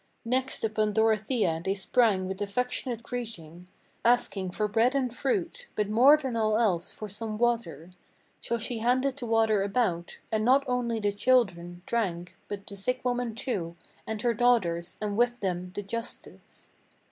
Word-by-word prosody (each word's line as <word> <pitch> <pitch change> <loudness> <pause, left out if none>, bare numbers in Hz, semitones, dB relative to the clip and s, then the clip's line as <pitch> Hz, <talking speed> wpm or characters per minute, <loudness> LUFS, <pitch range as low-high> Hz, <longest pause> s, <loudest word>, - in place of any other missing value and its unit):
Next 260 +3 0
upon 215 -1 0
Dorothea 215 -5 +1
they 195 +2 0
sprang 200 -1 +2
with 190 +1 -5
affectionate 240 +3 -1
greeting, 180 -9 -6 0.4
Asking 225 -5 +2
for 210 +4 -1
bread 230 +5 +2
and 255 -4 0
fruit, 375 - -2
but 210 -1 0
more 255 +8 +7
than 265 -5 -4
all 215 -1 +2
else 190 -7 +1
for 215 - -7
some 215 +2 -4
water. 190 -9 -1 0.5
So 235 - -2
then 230 - -4
she 235 +1 -2
handed 255 +3 +1
the 245 -4 -5
water 225 -2 +3
about; 195 -4 -1
and 215 -1 +1
not 265 +4 +4
only 245 -2 0
the 205 -1 +1
children 190 -7 +1
Drank, 180 -7 -2
but 200 -1 -6
the 200 - -8
sick 250 +6 -2
woman 245 -2 -1
too, 185 -9 -3 0.3
and 220 -1 -3
her 240 -1 +2
daughters, 200 -8 +1
and 210 -1 -2
with 240 +2 +2
them 180 -2 -3
the 205 - -3
justice. 230 +4 -8
220 Hz, 165 wpm, -28 LUFS, 195-245 Hz, 0.5 s, more